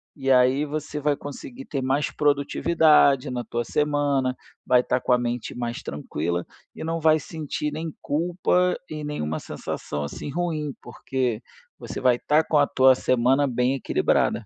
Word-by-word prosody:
e 135 -2 0
aí 130 +3 +4
você 150 0 -4
vai 145 0 +1
conseguir 245 - -9
ter 140 -10 -3
mais 135 +3 0
produtividade 145 -1 +3
na 120 -1 -3
tua 120 0 -3
semana, 145 -3 0 0.3
vai 125 -1 +5
estar 125 - -1
com - - -1
a 125 - +5
mente 120 -1 -3
mais 120 -1 -4
tranquila 85 +4 -3 0.3
e - - -7
não 165 +1 -2
vai 155 0 +4
sentir 150 -1 -4
nem 160 +1 -4
culpa 180 +3 +1
e 155 -1 -5
nenhuma 80 - -3
sensação, 75 0 -5
assim, 70 - -6
ruim, 155 -3 -2
porque 125 -4 -3 0.4
você - - -6
vai 125 -2 +4
estar 150 +5 +2
com 155 - +2
a 145 - +4
tua 130 0 +5
semana 130 +3 +2
bem 125 +1 +1
equilibrada. 135 - +1
140 Hz, 160 wpm, -24 LUFS, 125-150 Hz, 0.4 s, vai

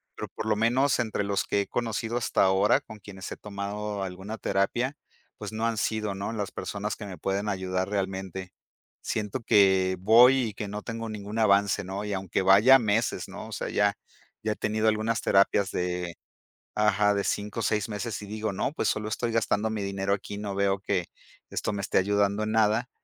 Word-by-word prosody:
pero - - -5
por - - -7
lo 110 - +2
menos 125 +5 +2
entre 110 -3 -1
los 100 -1 0
que 100 - +1
he - - -4
conocido 115 0 -2
hasta 120 - +2
ahora, 100 +6 +4
con 110 -6 -12
quienes 95 -1 -9
he - - -6
tomado 105 0 -4
alguna 95 +4 -6
terapia, 120 +9 0 0.4
pues - - -6
no 110 +1 -2
han 115 -1 0
sido, 105 -1 -1
¿no?, 100 +2 -4
las 105 -3 -3
personas 105 +1 -4
que 105 - -8
me 90 - -8
pueden 100 +5 -1
ayudar 95 -1 -2
realmente. 95 -2 -3 0.5
Siento 105 +2 -2
que 95 -4 +4
voy 120 +6 +7
y - - -9
que 105 +1 -5
no 105 +1 -6
tengo 115 -1 -5
ningún 105 +1 -5
avance, 100 -1 +3
¿no?, 95 +2 -4
y 105 - -3
aunque 95 -1 -1
vaya 105 +8 +7
meses, 110 -1 0
¿no?, - - -8
o - - -11
sea, - - -3
ya 100 0 +2 0.5
ya 110 -1 0
he - - -13
tenido 110 +1 0
algunas 110 +1 +1
terapias 100 0 +3
de 90 -1 -2 0.6
ajá, 105 -1 +3
de 100 -1 0
5 105 +2 -2
o - - -1
6 105 0 +1
meses 105 +1 -4
y - - -7
digo: 110 +1 -3
"No, 100 - -1
pues 110 - -1
solo 105 0 -1
estoy 115 +2 -2
gastando 110 -1 +1
mi 105 -2 -3
dinero 100 0 -2
aquí 100 +1 -4
y - - -6
no 100 -2 -4
veo 100 0 +1
que 95 -3 -1 0.5
esto - - -2
me 100 - -3
esté 100 - 0
ayudando 100 +2 +1
en 110 - -2
nada", 110 +3 +2
105 Hz, 205 wpm, -27 LUFS, 100-110 Hz, 0.6 s, voy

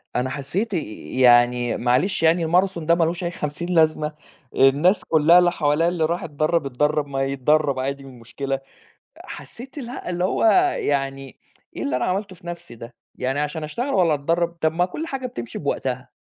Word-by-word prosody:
أنا 125 +1 0
حسيت 185 - -3
آآ - - +1 0.4
يعني 120 -1 +4
معلش 130 +9 +1
يعني 165 +1 +3
الماراثون 175 0 +1
ده 170 +1 +4
ما 170 - +2
لوش 170 +2 -2
أي 175 - -2
خمسين 150 +2 -5
لازمة 155 -3 +2 0.4
الناس 145 +9 +4
كلها 165 +2 +5
اللي 175 -1 +3
حواليا 155 0 +1
اللي 175 -2 0
راح 170 +3 -2
اتدرب 155 +1 0
اتدرب، 150 +3 0
ما 135 -1 -2
يتدرب 140 +1 +1
عادي 140 +1 -3
إيه 135 - -11
المشكلة 135 +3 -5 0.7
حسيت 260 +5 -10
الها 245 -7 -6
اللي 180 0 -2
هو 190 - 0 0.4
يعني 135 -1 -2 0.4
إيه - - -4
اللي 140 - -1
أنا 125 - 0
عملته 190 +1 -2
في 175 - -15
نفسي 170 -8 -8
ده 115 +1 -11 0.2
يعني 135 +2 -2
عشان 150 +2 -3
أشتغل 235 - -4
والّا 175 -5 +3
أتدرب 165 +4 0
طَب 160 - +2
ما 175 +2 +1
كل 305 - -6
حاجة 265 -4 -4
بتمشي 120 - -7
بوقتها 130 -3 -3
155 Hz, 180 wpm, -22 LUFS, 135-175 Hz, 0.7 s, كلها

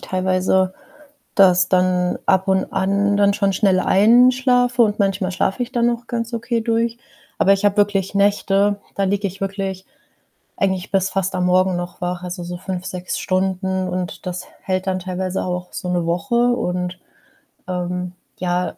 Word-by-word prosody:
teilweise 185 0 0 0.6
das 180 -2 +5
dann 180 -1 +2
ab 190 0 +2
und 190 0 +2
an 200 +1 +1
dann 200 0 +4
schon 200 -1 +1
schnell 190 -2 +3
einschlafe 245 +4 +4
und 210 -2 +2
manchmal 195 -1 0
schlafe 195 +6 -1
ich 245 - -9
dann 240 -1 +2
auch 240 0 -4
ganz 230 0 -3
okay 235 0 -1
durch. 230 +1 0 0.4
Aber 195 - +5
ich 195 - -2
habe 205 +1 +2
wirklich 200 -1 +1
Nächte, 200 0 +2
da 195 - 0
liege 200 +1 0
ich 190 - -9
wirklich 195 -1 -4 0.7
eigentlich 190 -2 -1
bis 195 -1 +1
fast 195 -1 -1
am 180 -1 0
Morgen 185 0 +3
noch 175 0 -6
wach, 175 0 -3
also 180 0 -5
so 175 0 -5
5, 185 0 -5
6 180 -2 -4
Stunden, 190 0 -1
und 180 0 -5
das 180 0 -4
h - - -21
hält 185 0 -2
dann 185 -1 0
teilweise 185 0 -3
auch 180 0 -4
so 180 - -5
'ne 175 -1 0
Woche, 175 +9 -1 0.2
und, 180 -3 -3 0.7
ähm, 180 0 -3 0.2
ja, 180 0 -2
190 Hz, 170 wpm, -20 LUFS, 180-205 Hz, 0.7 s, das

